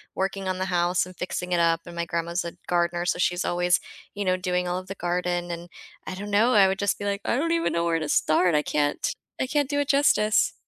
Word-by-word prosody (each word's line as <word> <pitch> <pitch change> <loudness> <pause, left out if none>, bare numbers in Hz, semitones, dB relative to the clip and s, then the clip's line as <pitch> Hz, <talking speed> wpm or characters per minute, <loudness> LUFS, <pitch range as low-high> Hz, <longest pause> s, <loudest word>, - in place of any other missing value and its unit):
working 195 0 -2
on 185 0 -1
the 185 - -1
house 175 -1 +1
and 185 0 -12
fixing 180 0 -4
it 175 - +2
up 165 0 +3
and 170 -1 -10
my 170 - -1
grandma's 170 +1 -2
a 170 - -5
gardener, 175 0 0
so 180 - 0
she's 175 0 +1
always, 175 0 +2 0.4
you 205 - -2
know, 185 0 +2
doing 180 0 -1
all 180 +1 -1
of 185 - -12
the 195 - -6
garden 175 0 -2
and, 170 +1 -6 0.4
I - - -4
don't 205 +2 -6
know, 225 +5 +4
I 200 -2 +6
would 190 0 -2
just 200 -1 +1
be 205 - -7
like, 200 0 -1
"I - - +1
don't 330 +5 0
even 335 0 +1
know 170 - +1
where 165 -1 +1
to 155 - -3
start, 160 +3 +3
I 150 - +4
can't 145 -1 0 0.3
I 260 - 0
can't 290 0 0
do 285 -1 0
it 285 - -3
justice." 275 -7 +3
180 Hz, 260 wpm, -25 LUFS, 175-200 Hz, 0.4 s, I